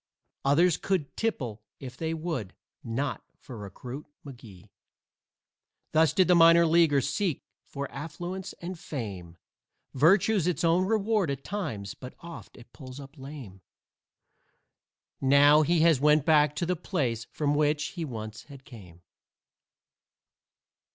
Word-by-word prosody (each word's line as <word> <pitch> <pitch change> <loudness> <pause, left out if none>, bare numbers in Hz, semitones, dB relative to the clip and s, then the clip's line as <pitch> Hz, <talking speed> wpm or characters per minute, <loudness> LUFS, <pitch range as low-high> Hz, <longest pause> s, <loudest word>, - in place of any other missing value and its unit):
Others 160 +4 +4
could 180 -7 -2
tipple 125 - -3 0.2
if 130 -2 -9
they 160 +3 -3
would 155 - -4 0.3
not 130 +5 -3
for 125 - -11
Recruit 120 +8 -8 0.2
McGee. 115 -9 -13 1.2
Thus 160 -2 +4
did 185 -3 +3
the 180 - +5
minor 170 0 +7
leaguer 160 -4 +4
seek 145 +5 -2 0.2
for 140 0 -5
affluence 175 +7 -6
and 175 0 -8
fame 95 - -7 0.6
Virtue's 180 +6 +3
its 180 - -1
own 170 +3 +3
reward 215 -4 +1
at 140 -1 -4
times, 140 - -4
but 125 0 -11
oft 170 0 -11
it 120 -1 -16
pulls 130 -2 -10
up 140 +1 -12
lame. 135 -9 -10 1.6
Now 145 +3 +6
he 165 +2 +2
has 165 -4 +4
went 150 0 +3
back 150 -2 +4
to 170 - -1
the 180 +1 0
place 130 - -2
from 145 -1 -1
which 150 0 +1
he 175 - -6
once 110 -6 -7
had 140 -2 -14
came! 90 - -14
145 Hz, 130 wpm, -28 LUFS, 125-170 Hz, 1.6 s, minor